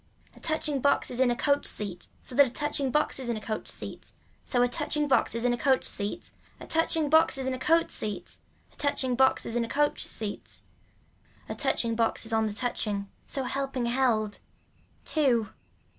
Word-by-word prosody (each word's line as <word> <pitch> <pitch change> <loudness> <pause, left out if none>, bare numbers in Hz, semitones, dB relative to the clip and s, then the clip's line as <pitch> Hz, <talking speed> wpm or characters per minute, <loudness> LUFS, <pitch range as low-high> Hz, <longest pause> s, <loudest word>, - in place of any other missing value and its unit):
A - - -15
touching 305 -3 0
box 280 - +2
is 245 - -4
in 260 -1 +4
a 240 - +1
coach 280 +3 +1
seat 195 -4 -2
so - - -8
that 280 +2 +6
a - - -5
touching 280 +1 -1
box 300 +1 +1
is 255 -2 -4
on 235 - -1
a - - -4
coach 215 0 -4
seat - - -6 0.3
so 245 -2 +2
a - - +4
touching 295 +4 -1
box 265 -3 +2
is 230 +1 -1
on 245 - +3
a - - -1
coach 265 -1 +2
seat, 205 +12 -3 0.3
a - - -9
touching 325 -1 +2
box 315 -1 +4
is 265 - -3
on 260 - -1
a 255 - -4
coat 330 +4 +3
seat, 210 -2 -4 0.3
a - - -18
touching 275 -3 0
box 265 +2 +3
is 230 - -4
on 240 - +2
a 230 - -5
coach 295 +1 +1
seat. 215 -2 -6 0.8
A - - -4
touching 230 -1 0
box 225 0 0
is 225 - -2
on 220 0 +2
the 210 - -4
touching 205 -3 -2 0.2
so 270 - -3
helping 265 -1 -2
held. 235 -4 +1 0.7
Two. 245 -9 +2
250 Hz, 205 wpm, -28 LUFS, 225-280 Hz, 0.8 s, that